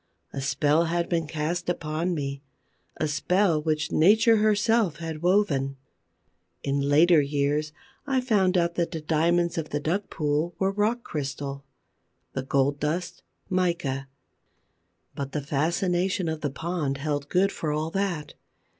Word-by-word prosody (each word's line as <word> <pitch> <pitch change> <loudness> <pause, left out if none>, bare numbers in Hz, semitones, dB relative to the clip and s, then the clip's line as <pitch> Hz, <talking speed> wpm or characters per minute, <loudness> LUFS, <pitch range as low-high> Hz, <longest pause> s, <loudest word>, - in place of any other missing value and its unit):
A 135 - -3
spell 150 +4 +2
had 170 +1 0
been 165 -3 0
cast 165 +3 -2
upon 170 +1 -1
me—a 140 +1 -6
spell 170 +2 +2
which 155 0 -1
Nature 220 +7 +5
herself 215 -3 +2
had 160 -2 -6
woven. 160 -8 +2 0.9
In 140 0 0
later 155 +4 +5
years 145 +2 0 0.4
I 265 -2 +2
found 200 -7 +2
out 170 -1 +1
that 170 -1 0
the 165 -3 -5
diamonds 170 +2 +1
of 155 - -5
the 145 - -1
duck 175 +7 -2
pool 150 +3 -1
were 190 0 +1
rock 215 +4 0
crystal, 140 -1 -5 0.7
the 135 - -2
gold 140 +1 +1
dust, 160 +5 -2 0.3
mica; 170 -8 -1 1.1
but 140 -1 -5
the 150 - -1
fascination 175 +5 0
of 160 -1 -3
the 145 - -1
pond 155 -1 -2
held 145 0 -3
good 195 +2 +3
for 155 - -3
all 155 +2 -2
that. 175 -6 -2
160 Hz, 140 wpm, -26 LUFS, 145-180 Hz, 1.1 s, Nature